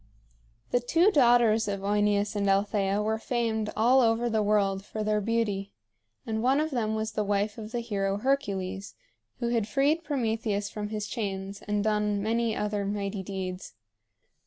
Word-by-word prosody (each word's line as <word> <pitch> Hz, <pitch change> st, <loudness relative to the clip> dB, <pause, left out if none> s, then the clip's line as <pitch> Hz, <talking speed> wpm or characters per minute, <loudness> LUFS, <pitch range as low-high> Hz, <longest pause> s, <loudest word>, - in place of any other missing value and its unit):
The 245 Hz, -, +3 dB
two 330 Hz, -, +3 dB
daughters 240 Hz, -, +4 dB
of 200 Hz, -1 st, -2 dB
OEneus 205 Hz, +1 st, +1 dB
and 200 Hz, -1 st, +1 dB
Althea 200 Hz, 0 st, +1 dB
were 220 Hz, +1 st, 0 dB
famed 225 Hz, -3 st, -1 dB
all 245 Hz, +4 st, +5 dB
over 230 Hz, 0 st, +2 dB
the 220 Hz, -1 st, +2 dB
world 200 Hz, -2 st, +1 dB
for 215 Hz, +1 st, -5 dB
their 210 Hz, 0 st, +1 dB
beauty; 205 Hz, -3 st, -1 dB, 0.5 s
and 220 Hz, -1 st, -2 dB
one 265 Hz, +4 st, +3 dB
of 310 Hz, +1 st, -1 dB
them 220 Hz, -4 st, -1 dB
was 220 Hz, 0 st, -2 dB
the 215 Hz, -, -1 dB
wife 205 Hz, +1 st, -1 dB
of 215 Hz, 0 st, -7 dB
the 240 Hz, 0 st, -2 dB
hero 200 Hz, -4 st, -1 dB
Hercules, 200 Hz, -6 st, -2 dB, 0.4 s
who 240 Hz, -1 st, -1 dB
had 230 Hz, -3 st, 0 dB
freed 285 Hz, +8 st, +1 dB
Prometheus 225 Hz, -7 st, -1 dB
from 210 Hz, -1 st, -4 dB
his 210 Hz, -1 st, -3 dB
chains, 195 Hz, -3 st, -4 dB
and 205 Hz, 0 st, 0 dB
done 210 Hz, -1 st, +1 dB
many 225 Hz, 0 st, 0 dB
other 210 Hz, -1 st, -1 dB
mighty 200 Hz, 0 st, -3 dB
deeds. 185 Hz, -, -6 dB
215 Hz, 165 wpm, -28 LUFS, 200-230 Hz, 0.5 s, all